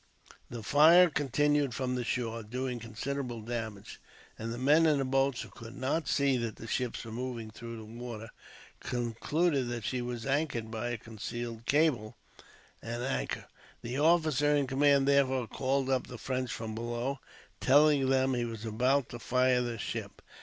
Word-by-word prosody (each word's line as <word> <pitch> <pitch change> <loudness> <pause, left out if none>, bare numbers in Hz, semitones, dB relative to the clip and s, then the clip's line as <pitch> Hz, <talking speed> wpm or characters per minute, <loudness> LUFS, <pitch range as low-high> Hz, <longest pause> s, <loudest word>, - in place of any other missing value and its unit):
The 115 -2 -7
fire 165 - +7
continued 145 -1 +1
from 130 -1 -1
the 125 -1 -1
shore, 115 -1 -2
doing 125 +3 -4
considerable 120 +2 -4
damage; 110 -3 -6 0.4
and 115 +1 -4
the 120 - -4
men 150 +6 +5
in 150 -2 +4
the 135 - 0
boats, 135 -1 +1
who - - -11
could 115 0 -11
not 140 +5 -1
see 140 -2 +2
that 115 -2 -3
the - - -10
ship 125 +1 -1
was 115 - -7
moving 120 -2 -5
through 115 +1 -8
the 110 - -9
water, 115 0 -7 0.5
concluded 130 +5 0
that 120 -2 -4
she 125 -1 -1
was 120 -1 -4
anchored 135 -5 -1
by 115 +1 -3
a 120 - -2
concealed 115 +1 -6
cable 140 -8 +2 0.6
and 120 +1 -4
anchor. 135 +1 -2 0.4
The 125 +3 -3
officer 155 -2 +3
in 145 -1 +2
command, 140 +1 +3
therefore, 130 -3 +3
called 135 +4 -1
up 130 -1 +1
the 125 - -8
Frenchmen 130 +1 -2
from 110 -2 -5
below, 120 +4 -3 0.4
telling 145 0 +5
them 130 0 +3
he 120 -1 0
was 115 -2 -5
about 125 +5 +1
to 120 - -7
fire 125 +1 +2
the 120 -1 -3
ship. - - -5
125 Hz, 170 wpm, -31 LUFS, 115-140 Hz, 0.6 s, fire